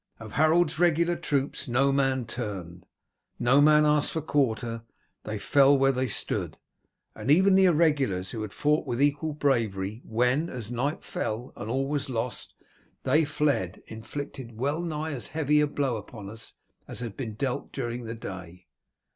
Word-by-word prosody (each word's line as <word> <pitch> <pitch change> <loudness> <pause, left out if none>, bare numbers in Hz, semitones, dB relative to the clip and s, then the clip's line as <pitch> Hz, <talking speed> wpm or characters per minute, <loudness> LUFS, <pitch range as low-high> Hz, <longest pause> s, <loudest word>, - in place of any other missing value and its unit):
Of 110 -1 -9
Harold's 155 +2 +3
regular 170 0 +3
troops 140 -3 -2
no 135 +3 +3
man 135 -2 +1
turned, 95 -7 -6 0.5
no 125 +4 +4
man 150 0 +6
asked 150 -1 +3
for 160 - -1
quarter, 120 -6 0 0.4
they 110 0 -3
fell 140 +6 +4
where 135 0 +4
they 130 0 -1
stood; - - -2 0.6
and - - -6
even 190 +6 +6
the 190 0 +6
irregulars, 145 - +2
who 115 - -5
had 105 -2 -5
fought 150 +6 +1
with 120 - -2
equal 145 +2 +1
bravery, 110 -7 0
when, 125 +8 +1
as 120 -3 -6
night 135 +5 -2
fell 115 +4 -4
and 105 - -6
all 135 +3 0
was 145 -1 -2
lost, 120 0 -3 0.5
they 155 +4 +3
fled, 145 - -1
inflicted 115 +1 -7
well 145 +7 -1
nigh 160 -2 -3
as 130 -5 -5
heavy 150 -1 +2
a 150 - +3
blow 140 -5 -1
upon 105 -1 -9
us 110 +1 -9 0.3
as - - -6
had 115 -4 -5
been 115 -6 -5
dealt 125 +2 -3
during 120 -2 -4
the 115 +1 -5
day. 90 -4 -9
135 Hz, 165 wpm, -27 LUFS, 115-150 Hz, 0.6 s, man